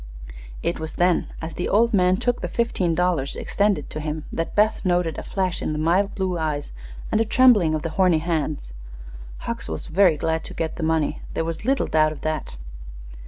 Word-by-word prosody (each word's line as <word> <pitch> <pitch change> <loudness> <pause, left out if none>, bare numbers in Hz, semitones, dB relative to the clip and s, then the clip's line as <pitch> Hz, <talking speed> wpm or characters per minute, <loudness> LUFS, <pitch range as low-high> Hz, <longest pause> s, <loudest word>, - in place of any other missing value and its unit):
It 170 - -1
was 160 0 -5
then, 175 0 +2 0.2
as 160 0 -5
the 180 - -3
old 230 +3 +3
man 185 -1 +4
took 245 +2 -1
the - - -2
fifteen 190 -8 0
dollars 175 -6 0
extended 200 -7 0
to 155 - -5
him, 155 0 -4
that 165 - -3
Beth 210 +1 +2
noted 175 -4 +1
a - - -4
flash 185 -3 -2
in - - -2
the - - -3
mild 175 +6 +1
blue 185 -3 -1
eyes 150 -2 -2 0.4
and 220 - +3
a - - +5
trembling 220 -8 +5
of 155 - -3
the 165 - -3
horny 180 -3 +5
hands. 155 - -2 0.7
Hucks - - -4
was 80 - -4
very 175 -1 +3
glad 160 +2 -1
to - - -8
get 160 -1 -3
the - - -5
money; 160 -1 0
there 165 - 0
was 165 +4 -4
little 270 +2 +2
doubt 155 -1 +2
of - - -11
that. 155 - -3
165 Hz, 205 wpm, -23 LUFS, 155-190 Hz, 0.7 s, a